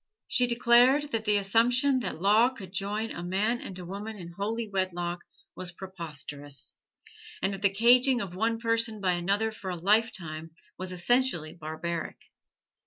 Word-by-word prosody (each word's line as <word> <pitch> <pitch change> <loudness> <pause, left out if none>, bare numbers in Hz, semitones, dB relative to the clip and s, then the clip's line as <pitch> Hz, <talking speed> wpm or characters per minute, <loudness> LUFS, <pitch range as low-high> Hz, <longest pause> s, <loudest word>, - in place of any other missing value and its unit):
She 250 - +2
declared 245 +5 +4
that 220 -1 -2
the 210 -1 +4
assumption 245 +7 +3
that 190 -9 -4
law 210 +6 +5
could 200 -9 -10
join 210 +3 -2
a - - -6
man 205 +7 0
and 185 - -7
a 180 - -8
woman 205 +4 -6
in 170 -3 -9
holy 220 +5 -3
wedlock 175 -3 -2 0.3
was 180 -1 -5
preposterous, 150 -6 -6 0.7
and 195 - 0
that 195 - -7
the 200 - +4
caging 245 +5 +4
of 195 -5 -5
one 225 +4 0
person 230 -1 0
by 190 -2 +1
another 200 +6 0
for 205 -3 -7
a 180 - -2
lifetime 170 -5 0 0.2
was 185 0 -5
essentially 180 -3 +1
barbaric. 165 +1 -5
200 Hz, 160 wpm, -28 LUFS, 175-230 Hz, 0.7 s, law